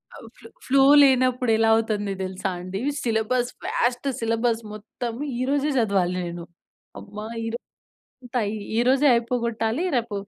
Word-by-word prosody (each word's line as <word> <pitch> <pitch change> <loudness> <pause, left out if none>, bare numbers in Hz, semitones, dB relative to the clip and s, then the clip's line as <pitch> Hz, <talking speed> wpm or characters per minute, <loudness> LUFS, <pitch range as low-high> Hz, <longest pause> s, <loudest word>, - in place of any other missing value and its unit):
ఆ! - - -10 0.2
Flow, - - -14 0.2
flow 270 +1 +4 0.2
లేనప్పుడు 255 -2 +3
ఎలా 225 0 +3
అవుతుంది 215 -3 -1
తెలుసా 190 +1 -3
అండి? 185 +2 -5 0.2
సిలబస్ 240 +2 0
వాస్ట్ 245 +3 -1
సిలబస్ 230 0 0
మొత్తం 225 +3 -6 0.3
ఈ - - -1
రోజే 285 +1 +1
చదవాలి 195 -6 +1
నేను. 170 0 -6 0.6
అమ్మా! 210 +1 -9 0.2
ఈ - - -3
రోజు 235 - -5 0.6
అంతా 245 0 -2 0.4
ఈ - - +2
రోజే 270 +3 +4
అయిపోగొట్టాలి 235 +2 -1
రేపు 235 -3 -1
230 Hz, 140 wpm, -24 LUFS, 210-250 Hz, 0.6 s, Flow